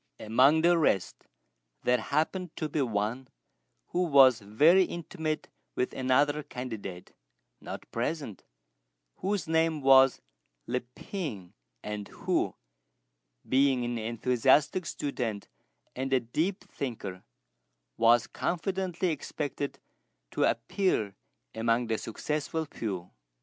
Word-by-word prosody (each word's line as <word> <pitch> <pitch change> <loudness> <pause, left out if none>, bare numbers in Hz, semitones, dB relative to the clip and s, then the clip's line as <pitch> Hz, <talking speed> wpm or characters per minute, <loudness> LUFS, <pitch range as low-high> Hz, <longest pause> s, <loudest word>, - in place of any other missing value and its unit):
Among 130 +8 +4
the 170 0 +4
rest 100 - 0 0.6
there 125 0 +3
happened 160 +7 -1
to 155 - -2
be 150 0 -1
one 115 +2 -1 0.6
who 180 - 0
was 135 -7 +6
very 150 - +5
intimate 160 -3 -4 0.3
with 125 - -1
another 140 +3 +2
candidate, 110 -10 -7 0.5
not - - -7
present, 120 - -3 0.7
whose 200 -2 -2
name 160 -1 +2
was 135 -1 +6 0.5
Li 125 +2 -1 0.2
Pien; 130 - -6 0.3
and 105 -1 -5
who, - - -1 0.9
being 130 -2 +3
an 120 -1 -2
enthusiastic 125 +9 +2
student 115 -8 -3 0.5
and 135 +1 -3
a 130 - +4
deep 160 - -2
thinker, 105 -9 -6 0.7
was 115 0 +5
confidently 185 0 -2
expected 145 -2 -4 0.5
to - - +2
appear 115 - 0 0.4
among 115 +2 +1
the 110 -1 -1
successful 150 +6 -3
few. 95 - -5
135 Hz, 105 wpm, -29 LUFS, 115-160 Hz, 0.9 s, was